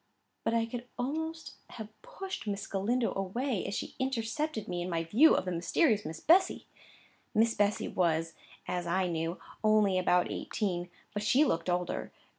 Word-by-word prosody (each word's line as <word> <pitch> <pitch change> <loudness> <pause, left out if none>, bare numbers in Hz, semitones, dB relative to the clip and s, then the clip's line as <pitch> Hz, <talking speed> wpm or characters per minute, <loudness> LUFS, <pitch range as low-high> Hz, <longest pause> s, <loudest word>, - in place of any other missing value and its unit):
But 230 - +1
I 230 0 +2
could 240 +1 -6
almost 320 +6 -3
have 220 -2 -8
pushed 385 - -7
Miss 200 0 -2
Galindo 225 +5 0
away, 210 +4 -2
as 200 - -3
she - - -4
intercepted 260 0 -2
me 175 -1 -2
in 175 - -3
my 165 -1 0
view 230 - +6
of - - 0
the 185 - -2
mysterious 205 - +2
Miss 160 +1 -5
Bessy. 360 +4 +4 0.7
Miss 225 +1 +4
Bessy 205 0 +1
was, 165 -2 0 0.3
as 175 -1 -2
I 185 +2 +1
knew, 165 0 -2 0.2
only 210 -3 +4
about 180 -1 +2
eighteen, 180 -4 -2 0.2
but 205 - -2
she 255 +8 +4
looked 165 - 0
older. 175 0 -1
205 Hz, 165 wpm, -31 LUFS, 180-245 Hz, 0.7 s, view